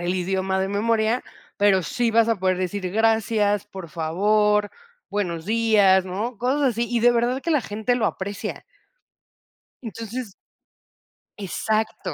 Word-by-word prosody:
el 175 Hz, +1 st, -1 dB
idioma 190 Hz, +1 st, -1 dB
de 190 Hz, -, -1 dB
memoria, 220 Hz, +3 st, +1 dB, 0.3 s
pero 200 Hz, -3 st, +3 dB
sí 235 Hz, +8 st, -1 dB
vas 230 Hz, 0 st, +3 dB
a 230 Hz, -, +2 dB
poder 185 Hz, 0 st, +1 dB
decir: 185 Hz, 0 st, -3 dB
"Gracias, 215 Hz, -1 st, +1 dB
por 190 Hz, -4 st, -9 dB
favor, 205 Hz, +6 st, +1 dB, 0.4 s
buenos 175 Hz, -6 st, -3 dB
días", 210 Hz, -4 st, +4 dB
¿no?, 205 Hz, +5 st, -4 dB
cosas 260 Hz, +6 st, 0 dB
así. 235 Hz, +1 st, -2 dB
Y 240 Hz, -1 st, +1 dB
de 245 Hz, +2 st, +5 dB
verdad, 240 Hz, +2 st, 0 dB
que 335 Hz, -, -2 dB
la 300 Hz, -4 st, +3 dB
gente 220 Hz, +3 st, -1 dB
lo 230 Hz, -3 st, +1 dB
aprecia. 200 Hz, +1 st, -5 dB, 1.2 s
Entonces 230 Hz, -1 st, -6 dB, 1.1 s
Exacto. 215 Hz, +3 st, -2 dB
210 Hz, 140 wpm, -23 LUFS, 190-230 Hz, 1.2 s, de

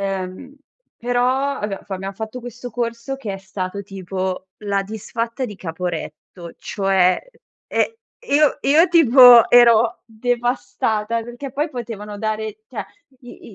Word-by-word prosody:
Ehm, 195 Hz, +8 st, -5 dB, 0.4 s
però 250 Hz, +3 st, +1 dB
abbiam 205 Hz, -2 st, -4 dB
f -, -, -34 dB
abbiam 195 Hz, +1 st, -4 dB
fatto 220 Hz, +4 st, -6 dB
questo 245 Hz, +1 st, -8 dB
corso, 235 Hz, +3 st, -3 dB
che 225 Hz, -7 st, -5 dB
è 195 Hz, -, -6 dB
stato 190 Hz, 0 st, -5 dB
tipo 190 Hz, -1 st, -5 dB, 0.2 s
la 200 Hz, -1 st, 0 dB
Disfatta 230 Hz, +4 st, -4 dB
di 210 Hz, -, -8 dB
Caporetto, 170 Hz, 0 st, -6 dB
cioè, 190 Hz, -2 st, +2 dB, 0.5 s
ehm, 460 Hz, -, 0 dB, 0.3 s
e 470 Hz, -, -2 dB
io 300 Hz, -1 st, +4 dB
io, 315 Hz, +6 st, +5 dB
tipo, 250 Hz, -7 st, +8 dB
ero 235 Hz, -1 st, +5 dB
devastata, 230 Hz, -1 st, -1 dB
perché 240 Hz, +3 st, -8 dB
poi 295 Hz, +3 st, -1 dB
potevano 220 Hz, -5 st, -7 dB
dare 220 Hz, -, -3 dB
cioè -, -, -5 dB, 0.4 s
i 245 Hz, -2 st, -13 dB
225 Hz, 135 wpm, -20 LUFS, 195-245 Hz, 0.5 s, tipo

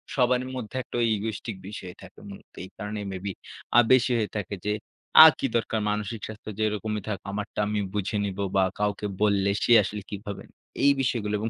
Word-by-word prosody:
সবারই 125 Hz, -1 st, +2 dB
মধ্যে 125 Hz, 0 st, -5 dB, 0.2 s
ওই 115 Hz, -, +3 dB
egoistic 110 Hz, +1 st, -4 dB
বিষয় 95 Hz, -3 st, -7 dB
থাকে -, -, -14 dB
মূলত 100 Hz, -, -12 dB
এই 95 Hz, -, -9 dB
কারণেই 105 Hz, 0 st, -5 dB
maybe 95 Hz, +1 st, -4 dB, 0.5 s
আ -, -, +10 dB
বেশি 130 Hz, -1 st, +5 dB
হয়ে 110 Hz, -2 st, -1 dB
থাকে 105 Hz, 0 st, -4 dB
যে, 105 Hz, -, +1 dB, 0.5 s
আ -, -, +12 dB
কি -, -, -1 dB
দরকার 115 Hz, -1 st, 0 dB
মানসিক 105 Hz, +2 st, -2 dB
স্বাস্থ্য 110 Hz, 0 st, -9 dB
যেরকমই 105 Hz, 0 st, -1 dB
থাকুক, 105 Hz, -3 st, -4 dB
আমারটা 105 Hz, +1 st, -5 dB
আমি 105 Hz, 0 st, -1 dB
বুঝে 105 Hz, 0 st, -1 dB
নিব 100 Hz, -1 st, -5 dB, 0.2 s
বা 95 Hz, -, +5 dB, 0.2 s
কাউকে 105 Hz, 0 st, -1 dB, 0.2 s
বললে 100 Hz, -2 st, +3 dB
সে -, -, +1 dB
আসলে 105 Hz, +1 st, -5 dB
কি -, -, -4 dB
ভাববে? 100 Hz, -1 st, -6 dB, 0.4 s
এই 140 Hz, -, +7 dB
বিষয়গুলো 115 Hz, -5 st, -1 dB
এবং 110 Hz, +2 st, -2 dB
105 Hz, 190 wpm, -26 LUFS, 100-110 Hz, 0.5 s, আ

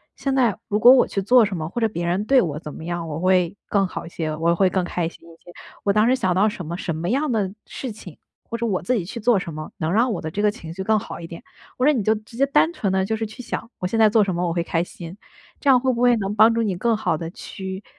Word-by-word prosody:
现 275 Hz, -, -2 dB
在 240 Hz, -7 st, +2 dB
如 210 Hz, -, 0 dB
果 240 Hz, +3 st, +9 dB
我 260 Hz, -1 st, +6 dB
去 195 Hz, -, -2 dB
做 240 Hz, +4 st, +5 dB
什 200 Hz, -2 st, -4 dB
么， 155 Hz, -2 st, -4 dB
或 240 Hz, -, -4 dB
者 225 Hz, -, +3 dB
别 170 Hz, -4 st, -4 dB
人 185 Hz, +4 st, 0 dB
对 265 Hz, +2 st, +5 dB
我 150 Hz, -4 st, -2 dB
怎 150 Hz, -2 st, -8 dB
么 -, -, -9 dB
样， 175 Hz, -1 st, -3 dB
我 155 Hz, 0 st, -4 dB
会 185 Hz, 0 st, +2 dB
更 200 Hz, -1 st, +2 dB
好 -, -, -6 dB
一 -, -, -9 dB
些， 160 Hz, -2 st, -3 dB
我 165 Hz, +2 st, +1 dB
会 190 Hz, +1 st, +3 dB
更 185 Hz, 0 st, 0 dB
开 175 Hz, -1 st, -2 dB
心 -, -, -18 dB
一 165 Hz, -, -14 dB
些。 175 Hz, -, -13 dB, 0.3 s
我 200 Hz, -, +2 dB
当 215 Hz, +2 st, +3 dB
时 255 Hz, -, +4 dB
想 190 Hz, -8 st, 0 dB
到 195 Hz, +4 st, +3 dB
什 185 Hz, -4 st, -7 dB
么 170 Hz, +3 st, -4 dB
什 170 Hz, -3 st, -3 dB
么 170 Hz, +3 st, -3 dB
样 275 Hz, +4 st, 0 dB
的 200 Hz, -5 st, -1 dB
事 260 Hz, -, -6 dB
情， 190 Hz, -6 st, -12 dB, 0.3 s
或 230 Hz, -, -3 dB
者 235 Hz, -, -2 dB
我 195 Hz, -5 st, -1 dB
自 250 Hz, +8 st, 0 dB
己 195 Hz, -7 st, -2 dB
去 235 Hz, +6 st, -7 dB
做 235 Hz, 0 st, +3 dB
什 170 Hz, -3 st, -4 dB
么， 155 Hz, 0 st, -7 dB
能 160 Hz, +1 st, -2 dB
让 235 Hz, +4 st, +3 dB
我 200 Hz, -, -2 dB
的 155 Hz, -, -5 dB
这 205 Hz, -, -2 dB
个 210 Hz, -, +4 dB
情 170 Hz, -7 st, -8 dB
绪 190 Hz, +2 st, -5 dB
更 220 Hz, +2 st, +2 dB
好 215 Hz, -, -6 dB
一 165 Hz, -, -8 dB
点。 170 Hz, +7 st, -10 dB, 0.3 s
或 255 Hz, -, +1 dB
者 300 Hz, -, +6 dB
你 250 Hz, -, 0 dB
就 220 Hz, +2 st, +3 dB
直 215 Hz, +2 st, -12 dB
接 270 Hz, +3 st, +3 dB
单 300 Hz, +4 st, +3 dB
纯 205 Hz, -, -1 dB
地 190 Hz, 0 st, +1 dB
就 220 Hz, -, -1 dB
是 220 Hz, 0 st, -3 dB
去 250 Hz, +4 st, -10 dB
想， 230 Hz, 0 st, -5 dB
我 -, -, -4 dB
现 225 Hz, +4 st, -1 dB
在 220 Hz, -1 st, +6 dB
做 215 Hz, 0 st, +4 dB
什 195 Hz, -2 st, -1 dB
么 175 Hz, +1 st, -1 dB
我 170 Hz, -, -1 dB
会 170 Hz, 0 st, 0 dB
开 165 Hz, 0 st, 0 dB
心。 175 Hz, 0 st, -10 dB, 0.4 s
这 285 Hz, -, 0 dB
样 255 Hz, -2 st, +7 dB
会 260 Hz, 0 st, +1 dB
不 235 Hz, -, -3 dB
会 245 Hz, -1 st, +5 dB
能 200 Hz, -1 st, -3 dB
帮 220 Hz, +2 st, +6 dB
助 230 Hz, 0 st, 0 dB
你 200 Hz, -4 st, -1 dB
更 225 Hz, +4 st, +1 dB
好 215 Hz, -, 0 dB
地 165 Hz, +1 st, -5 dB
去 190 Hz, +2 st, -7 dB
200 Hz, 335 characters per minute, -22 LUFS, 175-230 Hz, 0.4 s, 果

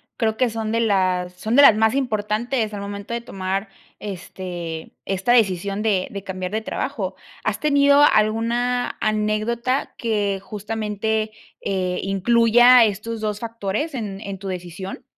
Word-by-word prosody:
creo 220 Hz, -2 st, 0 dB
que 250 Hz, -1 st, +2 dB
son 220 Hz, -1 st, -3 dB
de 230 Hz, -, +1 dB
las 185 Hz, -5 st, +1 dB
son 215 Hz, +6 st, -2 dB
de 285 Hz, -, +8 dB
las 220 Hz, -, +9 dB
más 220 Hz, +2 st, +2 dB
importantes 220 Hz, -1 st, -1 dB
al 205 Hz, -1 st, -6 dB
momento 200 Hz, +3 st, -5 dB
de 235 Hz, -, -3 dB
tomar, 195 Hz, -2 st, -3 dB, 0.3 s
este, 175 Hz, -4 st, -6 dB
esta 195 Hz, +5 st, 0 dB
decisión 200 Hz, -3 st, +2 dB
de 200 Hz, -4 st, +1 dB
de 200 Hz, -1 st, -6 dB
cambiar 185 Hz, -1 st, -5 dB
de 220 Hz, +1 st, -1 dB
trabajo, -, -, -3 dB, 0.3 s
¿has -, -, -1 dB
tenido 285 Hz, -1 st, +5 dB
alguna 235 Hz, +1 st, +2 dB
anécdota 215 Hz, +4 st, 0 dB
que, 205 Hz, -4 st, 0 dB
justamente, 215 Hz, +1 st, -3 dB, 0.3 s
eh, 185 Hz, -2 st, -1 dB
incluya 235 Hz, +5 st, +5 dB
estos 215 Hz, +2 st, -3 dB
2 210 Hz, -1 st, -2 dB
factores 230 Hz, +6 st, -3 dB
en 205 Hz, -5 st, -5 dB
en 200 Hz, -2 st, -6 dB
tu 195 Hz, +1 st, -8 dB
decisión? 180 Hz, +1 st, -6 dB
215 Hz, 145 wpm, -22 LUFS, 195-230 Hz, 0.3 s, las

